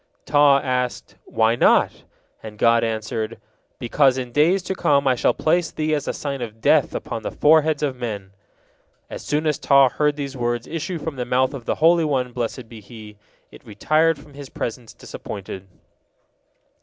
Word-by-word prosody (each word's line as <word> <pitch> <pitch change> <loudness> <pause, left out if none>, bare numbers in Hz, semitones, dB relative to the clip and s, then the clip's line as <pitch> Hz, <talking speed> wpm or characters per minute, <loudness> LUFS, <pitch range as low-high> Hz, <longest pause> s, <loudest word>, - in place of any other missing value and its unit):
Taw 145 -1 +5
asked, 125 -1 -2
"Why 110 +1 +1
not?" - - +2 0.4
and 105 -1 -10
God 115 +1 +3
answered: 110 0 -3 0.4
"Because 130 +2 +2
in 125 -2 -5
days 170 +8 +2
to 190 - -3
come 140 -6 +1
I 130 - +4
shall 120 - +1
place 165 +1 +1
thee 155 0 -2
as 145 -1 -2
a - - 0
sign 140 -3 -5
of 115 -2 -7
death - - +2
upon - - -5
the - - -4
foreheads 155 0 +3
of 140 -3 -1
men." 105 -6 -6 0.8
As - - -6
soon 150 +2 -1
as 150 -1 0
Taw 140 -2 +5
heard 150 +3 0
these 140 -2 -5
words 120 -1 -2
issue 165 +2 -4
from 160 -3 -6
the 125 - -2
mouth 130 +2 +1
of 130 -4 -8
the - - -1
Holy 165 +1 +4
One, 130 -5 -1
blessed 120 0 -4
be 110 -1 -12
He, 105 -1 -13 0.3
it - - -15
retired 155 +9 +1
from 145 0 -16
His 140 -1 -10
presence 115 0 -6
disappointed. 95 -1 -8
130 Hz, 180 wpm, -22 LUFS, 115-150 Hz, 0.8 s, Taw